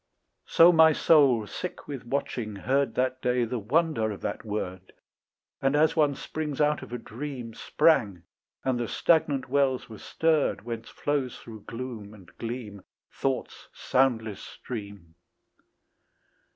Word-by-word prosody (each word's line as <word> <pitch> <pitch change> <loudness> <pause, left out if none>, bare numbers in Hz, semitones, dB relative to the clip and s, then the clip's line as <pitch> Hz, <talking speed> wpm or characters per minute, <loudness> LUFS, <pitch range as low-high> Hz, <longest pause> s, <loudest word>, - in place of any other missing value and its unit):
So 170 +2 +7
my 160 -2 +6
soul 140 -9 +4
sick 180 - -7
with 135 -4 -7
watching 120 -5 -3
heard 135 +7 0
That 130 0 0
day 125 -1 +1
the 120 +1 -3
wonder 135 0 +1
of 100 -3 -6
that - - -4
word, 95 -4 -5 0.7
And 135 +1 +2
as 155 +1 +3
one 150 -3 +3
springs 150 0 -5
out 150 0 +2
of - - -10
a 125 - -3
dream 120 0 -7
Sprang, 105 - +2 0.4
and 130 -2 0
the 120 - -2
stagnant 145 -3 +2
wells 135 -2 +1
were 110 - -10
stirred 160 -7 +1
Whence 115 -1 -6
flows 140 -4 -2
through 110 -3 -12
gloom 115 -4 -7
and 95 -5 -17
gleam 115 -4 -6 0.3
Thought's 135 -1 -3
soundless 115 -6 0
stream. 100 -8 -8
125 Hz, 140 wpm, -27 LUFS, 110-145 Hz, 0.7 s, So